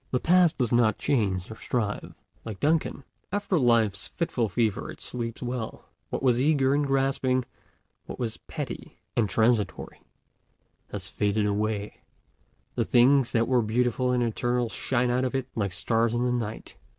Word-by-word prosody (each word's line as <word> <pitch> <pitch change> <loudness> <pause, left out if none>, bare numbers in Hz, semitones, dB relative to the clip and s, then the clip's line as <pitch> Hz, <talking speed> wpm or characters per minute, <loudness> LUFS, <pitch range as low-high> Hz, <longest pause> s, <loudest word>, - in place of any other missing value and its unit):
The 125 - 0
Past 175 +1 +4
does 125 -3 0
not 115 -3 +3
change 100 -8 0
or - - -6
strive; 110 -3 -3 0.3
like 110 -4 -7
Duncan, 155 -2 +1 0.3
after 200 -3 0
life's 115 -6 +2
fitful 125 -10 -1
fever 110 +1 0
it - - -9
sleeps 115 0 -5
well; 120 -2 -5 0.2
what - - -3
was 125 -2 +3
eager 140 -2 +3
and 145 0 +1
grasping, 135 -2 +1 0.6
what - - -6
was 115 -3 -3
petty - - -6 0.2
and 110 -4 +2
transitory, 110 -2 0 0.9
has 100 -2 -5
faded 105 +1 0
away, 105 0 -2 0.7
the - - 0
things 130 +1 +4
that 115 0 +2
were 125 -2 +3
beautiful 125 +3 +1
and 125 -1 +2
eternal 120 +1 0
shine 125 +1 0
out 125 +1 +1
of 130 +1 -1
it 135 -1 -1
like 100 -4 -1
stars 115 +5 +1
in 120 +1 +1
the 125 - +1
night. 115 -3 -4
120 Hz, 160 wpm, -27 LUFS, 110-130 Hz, 0.9 s, Past